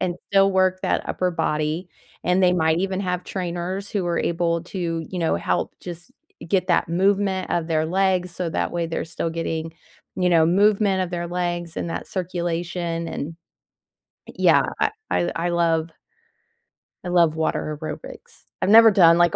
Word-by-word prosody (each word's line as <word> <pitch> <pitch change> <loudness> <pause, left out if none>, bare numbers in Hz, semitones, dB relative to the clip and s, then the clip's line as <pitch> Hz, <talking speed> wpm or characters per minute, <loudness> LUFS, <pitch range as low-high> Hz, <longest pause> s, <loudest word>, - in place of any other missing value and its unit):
and 180 -2 -1
still 195 0 +4
work 185 0 +2
that - - -1
upper 180 -1 0
body, 155 +2 -1 0.4
and 180 +2 +2
they 180 - +5
might 160 -2 +2
even 190 +1 -1
have 180 -2 -2
trainers 185 +2 -4
who 195 -4 -1
are 170 - 0
able 170 0 0
to, 170 -3 -3
you 185 - -5
know, 165 - +1
help 90 +1 -1
just 175 -1 -9 0.4
get 190 -1 +1
that - - +2
movement 190 +2 +1
of 170 -1 -1
their 160 -1 +1
legs 185 0 +1
so 175 -2 -3
that - - -2
way 170 -1 -1
they're 165 - -3
still 165 0 -3
getting, 165 -1 -3 0.4
you 180 -1 +2
know, 165 -2 +5
movement 200 +1 +3
of 180 - -3
their 175 -1 -3
legs 175 -1 -3
and - - -3
that - - -4
circulation, 170 -2 -3
and 160 +3 -5 1.0
yeah, - - +4 0.2
I - - +3 0.2
I 175 - +1
I 175 +1 -1
love 165 -1 +1 1.1
I - - -6
love 170 -3 +3
water 155 -1 -2
aerobics. 155 -1 -8 0.2
I've - - +1
never 225 +1 +9
done, 170 -4 +6
like, 175 -1 +3
175 Hz, 170 wpm, -23 LUFS, 165-185 Hz, 1.1 s, never